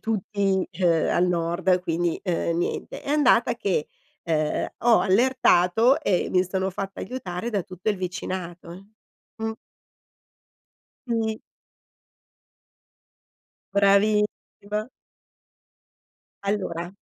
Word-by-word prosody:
tutti, 200 -3 -1
uhm, 170 -3 +3
al 180 - +3
nord 180 +2 +1
quindi, 170 -1 -1
uhm, 170 -2 -1
niente. 175 - -3
È - - -10
andata 285 -6 +4
che, 190 -9 -1 0.4
uhm, 155 -2 0
ho 235 -1 +5
allertato 230 +1 +4
e 185 - +1
mi 185 0 +3
sono 190 +1 -1
fatta 195 +1 -5
aiutare 195 -3 -5
da 205 -5 -1
tutto 185 +3 -6
il 210 - +1
vicinato 180 0 -6 0.5
mh. 220 0 -2 1.6
Sì. 220 -2 -1 2.3
Bravissima! 210 +1 +1 1.6
Allora 185 -4 -2
190 Hz, 90 wpm, -25 LUFS, 175-215 Hz, 2.3 s, ho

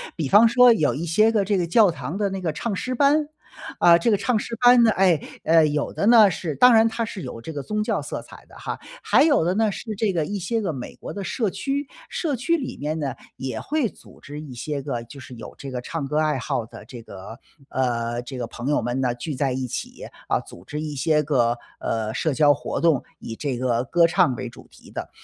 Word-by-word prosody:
比 160 -5 -2
方 215 - +7
说 245 +1 +6
有 155 -9 +1
一 160 +5 -4
些 215 +7 +3
个 215 -3 +2
这 200 0 0
个 175 - 0
教 210 +3 +5
堂 150 +3 -6
的 205 -1 0
那 195 0 -4
个 165 -4 -2
唱 215 +5 -3
诗 255 +6 -3
班， 290 +3 +3 0.5
啊， 170 -1 +7
这 195 +7 +1
个 205 - +3
唱 230 +3 +1
诗 230 - -4
班 245 0 +7
呢 225 - +5
哎， 185 -7 +3 0.2
呃， 160 0 +5
有 150 -1 -1
的 - - -1
呢， 225 -3 +8
是 165 -3 -4
当 250 - +6
然 225 0 +6
它 230 +1 -2
是 205 -3 -7
有 125 -5 -7
这 160 - -7
个 145 -2 -5
宗 210 +9 -2
教 - - -1
色 - - -5
彩 - - -15
的 - - -17
哈， - - -5 0.2
还 - - +4
有 290 - +4
的 175 - +1
呢， 220 0 +2
是 215 +2 -6
这 205 0 0
个 165 -4 -1
一 205 +5 -4
些 230 +5 -1
个 175 -6 -2
美 125 - -7
国 - - -8
的 200 - -5
社 215 +3 -1
区， 280 +6 -3 0.2
社 305 -5 -2
区 335 +8 +1
里 265 -5 -5
面 155 +2 -3
呢， 135 -4 -3 0.2
也 130 0 -4
会 295 -5 0
组 - - -15
织 145 +1 -9
一 145 -4 -9
些 140 +4 -4
个 130 -4 -4
就 135 +4 -12
是 125 0 -11
有 115 - -10
这 135 - -8
个 125 - -3
唱 155 +4 -4
歌 150 +2 -2
爱 155 -3 +1
好 115 -2 -2
的 110 - -12
这 120 +2 -10
个 105 +2 -11 0.3
呃， 120 -2 -1
这 130 +1 -8
个 120 - -3
朋 120 +2 -7
友 145 - +2
们 120 +3 -2
呢， 125 -2 0
聚 145 +5 -5
在 135 -1 -1
一 130 0 -2
起， - - -6 0.2
呃， - - +1
组 85 - -14
织 150 +1 -5
一 155 -1 -4
些 150 +2 +1
个， 120 -5 +1 0.2
呃， 110 -1 -2
社 155 +5 0
交 145 +1 +5
活 145 - -4
动， 160 -6 +3 0.2
以 115 - -7
这 140 -4 -3
个 120 -1 0
歌 170 +6 +4
唱 170 -6 +2
为 125 -1 -5
主 125 - -15
题 - - -17
的。 - - -6
155 Hz, 270 characters per minute, -23 LUFS, 130-210 Hz, 0.5 s, 呢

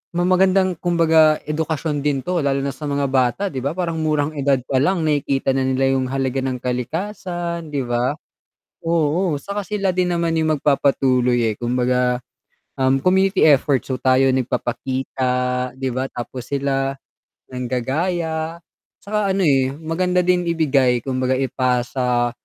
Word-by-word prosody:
ma 175 - +1
magandang 185 0 +3
kumbaga 160 -3 +4
edukasyon 150 -1 -2
din 140 -2 +1
'to, 175 -4 -1
lalo 140 -1 +1
na 140 0 -3
sa 150 - -7
mga 140 0 0
bata 130 +7 +1
'di 130 -5 -5
ba 140 - +1
parang 170 -3 -2
murang 155 -2 +1
edad 140 -1 +2
palang 145 +8 +2
nakikita 140 -3 0
na 135 - +1
nila 135 0 +1
yung 130 -1 0
halaga 135 -1 -1
ng 130 -1 -2
kalikasan, 170 - -3
'di 140 - 0
ba? 120 +3 0 0.7
Oo 165 +1 +1
'tsaka 200 +7 -4
sila 195 0 -1
din 180 -1 +1
naman 170 -1 0
yung 155 -1 +1
magpapatuloy 130 -5 +2
eh, - - -6
kumbaga, 125 +1 0 0.6
um 130 0 +3
community 190 +1 +3
efforts 140 -3 +3
so, 130 - -2
tayo 130 +1 +3
nagpapakita 125 0 -1
'di 130 0 -3
ba? 130 +2 -2
Tapos 125 0 -7
sila, 135 -1 -1 0.6
nanggagaya. 160 +6 -2 0.4
'Tsaka 205 -1 0
ano 195 - 0
eh, 135 -4 +2
maganda 180 +4 0
din 180 0 +1
ibigay 140 -7 +2
kumbaga 130 -1 0
ipasa 125 -1 0
140 Hz, 145 wpm, -20 LUFS, 130-170 Hz, 0.7 s, kumbaga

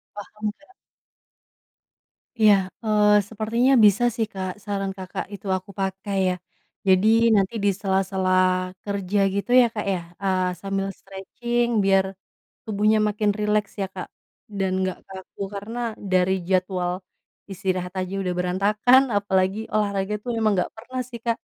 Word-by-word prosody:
Paham 210 +1 -9
ya. 340 +6 -22 1.7
Iya, 215 -1 +8 0.3
eee, 210 -1 +3 0.2
sepertinya 230 +4 +1
bisa 205 +3 +4
sih 225 -2 0
Kak, 190 -1 -3
saran 200 -1 -2
Kakak 185 -1 -5
itu 200 - -10
aku 185 +1 -12
pakai 195 +1 -3
ya. 180 - 0 0.5
Jadi, 190 +2 +5 0.3
nanti 195 +1 +2
di 205 - +4
sela-sela, 190 -1 0 0.5
kerja 200 -1 -1 0.2
gitu 200 +5 -2
ya - - +5
Kak 210 - -3
ya, 180 - -1 0.2
eee, 185 -1 +1
sambil 195 0 -2
stretching 235 +5 -3 0.2
biar, 195 -1 +4 0.6
tubuhnya 215 +1 +2
makin 210 0 0
rileks 210 0 0
ya 195 - 0
Kak, 185 - -6 0.5
dan 190 -1 0
nggak 185 -1 -3
kaku, 190 0 -12 0.2
karena 215 +4 -6 0.3
dari 185 0 +3 0.2
jadwal, 185 -1 0 0.6
istirahat 185 -1 -2
aja 185 +1 -4
udah 180 -1 -2
berantakan, 205 +8 +4 0.2
apalagi 190 0 0 0.2
olahraga 200 -1 0
itu 230 - -11
emang 220 -1 +2
nggak 180 - -1
pernah 255 +3 -6
sih 235 - -8
Kak. 230 -1 +1
200 Hz, 140 wpm, -24 LUFS, 190-215 Hz, 1.7 s, Iya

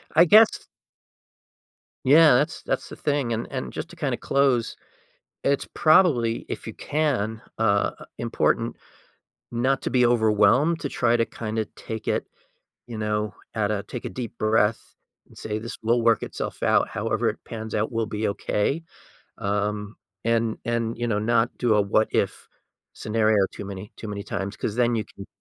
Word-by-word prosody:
I 170 - +8
guess 215 +5 +6 1.4
Yeah, 150 +3 +7
that's 150 +6 0
that's - - -2
the - - -8
thing, 140 -5 -1
and 115 +1 -2
and - - -4
just - - -6
to - - -12
kinda - - -2
close, 135 -4 +1 0.7
it's 140 0 +2
probably, 150 -9 +3
if - - -5
you - - -5
can 125 -8 -1 0.2
uh, 100 -2 +2 0.3
important - - 0 0.8
not 130 +3 +1
to - - -1
be 125 -2 +3
overwhelmed, 120 +7 +3
to 140 - -2
try 120 -2 +2
to 115 - +2
kinda 110 -1 -3
take 110 -1 -7
it, - - -1 0.6
you 115 - -6
know, 105 0 -1 0.2
at 110 -1 0
a 100 -1 -2
take 120 +4 -7
a - - -4
deep 120 -2 -6
breath 110 0 +1 0.3
and - - -19
say, 105 -1 -4
"This 115 +2 -6
will 115 +1 +2
work 115 -1 +3
itself - - -5
out. - - +3
However - - 0
it - - -6
pans 110 -1 -7
out 110 +1 0
will 115 0 0
be 105 +1 -2
okay," 105 +10 -1 0.5
um, 105 +1 -2 0.3
and 115 -1 +1
and, 115 -1 -1
you 120 - -1
know, 105 -2 +1
not 115 +2 +1
do 120 -3 +2
a 105 - +4
what-if 110 +2 0 0.5
scenario 110 -2 +2
too 100 - -7
many 100 +1 -8
too 110 - -7
many 100 -1 -4
times 100 0 -4
'cause 105 - -3
then 120 -1 +2
you 110 - -1
can 100 - -12
115 Hz, 170 wpm, -24 LUFS, 105-125 Hz, 1.4 s, I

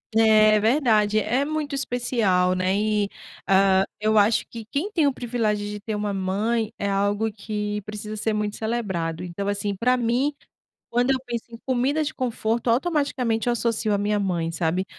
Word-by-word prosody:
É, 215 -1 +6
é - - +3
verdade, 215 -3 +3
é 245 +6 +1
muito 300 -1 -3
especial, 230 -9 +1
né, 185 +1 +1
e, 210 -1 +1 0.4
hã, 190 0 +4 0.2
eu 215 0 +2
acho 210 +2 +4
que 230 -1 -8
quem 300 +9 -1
tem 330 -8 +1
o 280 - +2
privilégio 220 -4 -1
de 210 0 -6
ter 215 0 -4
uma 205 -1 -2
mãe, 210 +4 -1
é 200 - -1
algo 205 +2 +1
que 210 0 -4
precisa 210 +1 -7
ser 220 +1 -1
muito 210 -1 -2
celebrado, 190 -8 -2
então, 180 +3 -4
assim, 205 0 -2
para 250 +5 +2
mim, 245 +5 +1 0.6
quando 245 +2 +1
eu 265 - +3
penso 235 -1 -4
em 230 - -10
comida 265 +4 +1
de 305 +1 -4
conforto, 235 -2 -1
automaticamente 255 -5 0
eu - - +4
associo 230 -2 0
a - - +2
minha 205 +1 0
mãe, 170 -4 -1
sabe, 170 +3 -1
215 Hz, 180 wpm, -24 LUFS, 205-240 Hz, 0.6 s, É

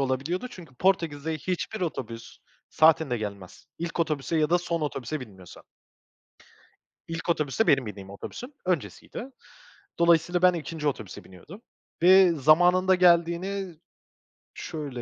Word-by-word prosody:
olabiliyordu. 140 - -1
Çünkü 165 - -13
Portekiz'de 160 -3 0
hiçbir 185 +7 -4
otobüs 115 -9 -5 0.3
saatinde 155 -5 +3
gelmez. 100 -4 -8
İlk 170 0 -3
otobüse 155 0 -1
ya 155 0 +1
da 175 - +4
son 170 -1 -3
otobüse 150 -1 -4
binmiyorsan. 95 -7 -12 1.5
İlk 165 +1 -6
otobüs 150 +1 -1
de 225 - +4
benim 135 -3 +3
bindiğim 100 -2 -8
otobüsün 245 - -9
öncesiydi. 180 - -3 0.7
Dolayısıyla 170 +1 +3
ben 180 - +6
2'nci 160 -2 -3
otobüse 110 -8 -6
biniyordum 155 - -14 0.4
ve 185 0 +7
zamanında 175 +5 +4
geldiğini 175 0 +1 0.8
-şöyle, 145 -6 -6
165 Hz, 120 wpm, -26 LUFS, 135-180 Hz, 1.5 s, ve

